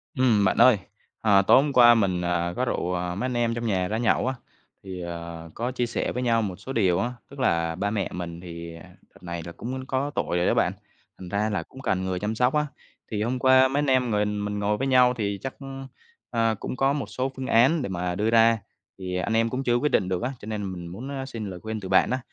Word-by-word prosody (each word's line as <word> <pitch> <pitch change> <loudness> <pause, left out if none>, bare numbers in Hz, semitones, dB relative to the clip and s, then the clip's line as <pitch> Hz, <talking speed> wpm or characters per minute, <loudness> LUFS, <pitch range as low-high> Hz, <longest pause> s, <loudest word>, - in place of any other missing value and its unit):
Ừm, 115 -6 +3
bạn - - +2
ơi, 125 -5 +7 0.4
ờ, 100 -3 +5
tối 130 - +6
hôm 145 -1 -2
qua 120 -2 +8
mình, 95 -5 +1
à, 85 0 -1
có 130 - 0
rủ, 90 - -1
ờ, 90 0 -2
mấy 115 - -2
anh 125 - -3
em 120 -1 +1
trong 115 0 -4
nhà 95 -4 0
ra 110 - -2
nhậu 120 +1 +1
á, 130 - 0 0.5
thì, 95 -2 -7
ờ, 85 -1 -7
có 120 +2 -2
chia 125 -1 -1
sẻ 120 - -2
với 125 - -3
nhau 115 -2 +2
một 100 -4 -3
số 105 +8 -8
điều 95 -7 +2
á. 120 +1 -1 0.2
Tức 140 - -12
là 85 -9 +1
ba 100 +4 -1
mẹ 100 -3 -1
mình 85 -1 -6
thì, 85 -1 -8
à, 85 - -14
đợt - - -21
này 85 -1 -5
là 85 - -7
cũng 130 +8 -6
có 135 +2 -1
tuổi 90 - -1
rồi 90 - +1
đó - - +3
bạn, - - +2 0.5
thành 90 - -8
ra 105 +3 0
là 100 -6 -2
cũng 130 +10 -13
cần 95 -7 0
người 95 -1 -2
chăm 105 +3 -2
sóc 125 +3 +2
á. 150 0 +1 0.4
Thì 105 -1 -1
hôm 125 +3 -1
qua 130 0 +6
mấy 135 +2 -1
anh 145 - +1
em 130 -2 +2
mình- 105 0 0
mình 105 0 -3
ngồi 105 +1 0
với 135 - -1
nhau 125 -1 +5
thì 100 -4 -3
chắc, 135 - -4 0.8
ờ, 115 -1 +1
cũng - - -4
có 135 +1 +2
một 145 -2 -2
số 130 +1 -3
phương 130 -1 -5
án 135 +8 +4
để 125 - -3
mà 90 -1 -2
đưa 105 +4 0
ra, 115 0 +5 0.4
thì 90 -1 -4
anh 90 +5 -1
em 115 +1 +2
cũng 130 +3 -3
chưa 120 -2 +2
có - - +2
quyết 150 +2 0
định 95 -3 +2
được 90 -1 -1
á, 125 - -1
cho - - -11
nên 105 -3 -4
mình 85 -1 -7
muốn, 105 +11 -7
a, 135 -1 -4
xin 115 -6 -6
lời 90 -2 -7
khuyên 110 +3 -5
từ 95 -2 -7
bạn 95 - +4
á. 130 - 0
110 Hz, 270 wpm, -25 LUFS, 90-125 Hz, 0.8 s, qua